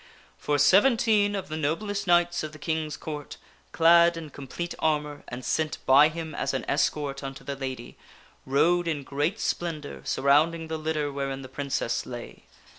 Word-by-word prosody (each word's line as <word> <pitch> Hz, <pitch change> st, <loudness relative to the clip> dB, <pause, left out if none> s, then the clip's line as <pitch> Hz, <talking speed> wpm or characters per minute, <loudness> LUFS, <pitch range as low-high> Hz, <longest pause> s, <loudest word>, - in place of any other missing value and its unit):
For 145 Hz, -, 0 dB
seventeen 205 Hz, -, +4 dB
of 195 Hz, -, -4 dB
the 155 Hz, -, -4 dB
noblest 200 Hz, +7 st, -2 dB
knights 175 Hz, 0 st, +3 dB
of 155 Hz, 0 st, -6 dB
the -, -, -10 dB
King's 155 Hz, -1 st, -3 dB
Court, 150 Hz, -2 st, -7 dB, 0.3 s
clad 170 Hz, +1 st, +5 dB
in 160 Hz, -3 st, -8 dB
com 140 Hz, -1 st, -10 dB
plete 175 Hz, +5 st, -4 dB
armor, 150 Hz, -2 st, -1 dB
and 120 Hz, +1 st, -7 dB
sent 155 Hz, -1 st, -1 dB
by 140 Hz, +3 st, +7 dB
him 160 Hz, -1 st, -6 dB
as -, -, -2 dB
an -, -, -3 dB
escort 140 Hz, -1 st, 0 dB
unto 135 Hz, 0 st, -7 dB
the 140 Hz, -, -4 dB
lady, 130 Hz, -3 st, -6 dB, 0.4 s
rode 170 Hz, +6 st, +2 dB
in 150 Hz, -4 st, -2 dB
great 145 Hz, +10 st, -1 dB
splendor, 160 Hz, -4 st, -3 dB
surrounding 150 Hz, +5 st, +2 dB
the 160 Hz, 0 st, -3 dB
litter 155 Hz, -2 st, -1 dB
wherein 135 Hz, -1 st, -4 dB
the -, -, -8 dB
Princess 135 Hz, -4 st, -2 dB
lay. 120 Hz, -1 st, -9 dB
155 Hz, 170 wpm, -26 LUFS, 140-170 Hz, 0.4 s, by